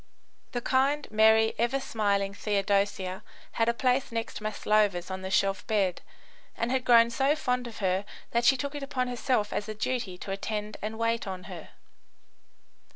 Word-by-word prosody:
The 245 - -1
kind, 275 +4 +1
merry, 220 +1 +5
ever 240 +4 +1
smiling 200 -6 0
Theodosia 200 -2 0 0.3
had 230 0 +1
a - - +2
place 255 +1 +1
next 230 -1 -4
Maslova's 210 -4 +1
on 190 0 -4
the 190 - -5
shelf 195 0 +1
bed, 200 -6 +1 0.6
and 230 +1 -1
had 260 -1 0
grown 235 -1 +6
so 270 +5 +2
fond 250 -4 -1
of 230 - -9
her 185 +1 +1 0.3
that 235 0 +1
she 270 +2 +5
took 280 +2 -4
it 290 - -5
upon 255 -2 -2
herself 245 -3 0
as 210 +1 -3
a 215 - -4
duty 220 -4 -2
to 195 - -7
attend 210 +1 -4
and 215 +1 -4
wait 230 -1 0
on 185 -1 -5
her. - - -9
220 Hz, 170 wpm, -28 LUFS, 200-250 Hz, 0.6 s, grown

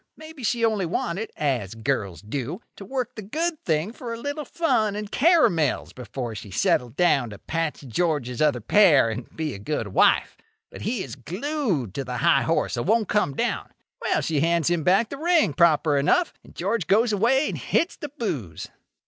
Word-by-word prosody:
Maybe 315 -4 -11
she 230 +1 +1
only 210 -5 0
wanted, 185 +6 -2
as 125 -9 -1
girls 110 -6 -2
do, 135 - -4 0.2
to - - -10
work 250 +3 -3
the 215 - -7
good 315 - -3
thing 160 +6 0
for 245 -1 -7
a 230 - -4
little 285 +3 -4
fun 220 -11 +1
and 210 -1 -5
caramels 240 - +3
before 125 -1 -6
she 105 -1 -8
settled 120 +5 +1
down 145 -9 +2
to 100 - -9
patch 165 +6 -3
George's 135 -2 -1
other 145 -6 +2
pair, 150 - +5
and 115 +2 -6
be 155 -3 -2
a - - -8
good 110 -1 -3
wife. - - +3 0.3
But - - -10
he 220 -2 -2
is - - -8
glued 180 - -2
to 135 - -3
the 125 -1 -5
high 170 +6 +4
horse, 165 -5 0
and 120 - -2
won't 220 0 +2
come 205 -10 +1
down. - - -2 0.3
Well, - - +1
she 155 -3 0
hands 170 +2 +2
him 175 -2 +1
back 195 +7 +3
the 280 - -6
ring, 330 - +2
proper 160 -3 +3
enough; 335 - +2
and - - -17
George 195 +1 -1
goes 220 +3 +3
away 245 +8 +3
and - - -3
hits 340 - 0
the 295 - -7
booze. 140 - -5
170 Hz, 190 wpm, -24 LUFS, -, 0.3 s, pair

